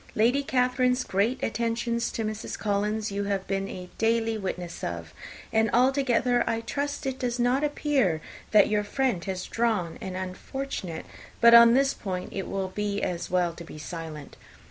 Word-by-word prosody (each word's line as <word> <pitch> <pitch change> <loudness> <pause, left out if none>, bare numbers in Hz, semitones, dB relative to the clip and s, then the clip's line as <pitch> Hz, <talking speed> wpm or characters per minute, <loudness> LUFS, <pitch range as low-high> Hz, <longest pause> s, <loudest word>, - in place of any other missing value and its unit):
Lady 240 +6 +3
Catherine's 250 -1 +2
great 215 +7 0
attentions 235 +1 -1
to 225 - -3
Mrs. 215 0 -4
Collins 210 +1 -1
you 200 0 -2
have 195 -1 -1
been 195 0 -2
a 180 -1 -7
daily 225 0 +2
witness 180 -4 -5
of; 85 -2 -5 0.4
and 220 0 +3
altogether 250 -1 +3
I 230 -1 0
trust 285 +5 -3
it 265 -1 -2
does 245 -1 -1
not 250 +3 +2
appear 285 - +1 0.3
that 215 - +6
your 210 -1 +1
friend 235 -4 0
has 190 -2 -3
drawn 220 -8 -1
an 185 -1 -5
unfortunate 185 -1 -5 0.3
but 235 0 +7
on 235 0 +9
this 275 +1 +3
point 185 -2 -5
it 195 - -3
will 195 -1 -2
be 205 +1 -2
as 175 -1 -2
well 180 -2 +1
to 170 - -9
be 160 - -10
silent. 155 -2 -7
220 Hz, 165 wpm, -27 LUFS, 185-245 Hz, 0.4 s, on